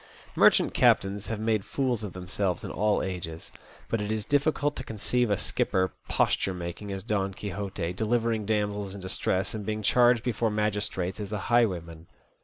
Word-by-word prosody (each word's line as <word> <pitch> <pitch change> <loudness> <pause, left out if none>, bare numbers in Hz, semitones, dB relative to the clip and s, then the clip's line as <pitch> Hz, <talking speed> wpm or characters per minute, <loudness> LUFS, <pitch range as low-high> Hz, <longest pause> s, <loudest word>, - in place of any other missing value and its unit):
Merchant - - +5
captains 100 +1 +3
have 110 -2 -3
made 110 -2 +1
fools 125 -3 -1
of 100 - -5
themselves 90 +1 -2
in - - -5
all 105 +2 +1
ages; 85 -3 -5 0.4
but 115 - -1
it 105 +1 -2
is 110 -1 -2
difficult 145 +1 +1
to 130 - -4
conceive 120 +1 0
a 100 - +2
skipper 95 0 0 0.2
posture 95 - +1
making 90 +4 -6
as 95 -1 -4
Don 100 -3 -1
Quixote, 95 -3 -4
delivering 110 +1 0
damsels 105 -2 -1
in 100 - -8
distress, 95 +1 -1
and 110 -2 -4
being 110 +1 -3
charged 120 +1 +4
before 115 -2 0
magistrates 105 -3 -1
as 105 -1 -5
a 105 - -1 0.2
highwayman. 85 -8 +1
105 Hz, 170 wpm, -28 LUFS, 95-110 Hz, 0.4 s, Merchant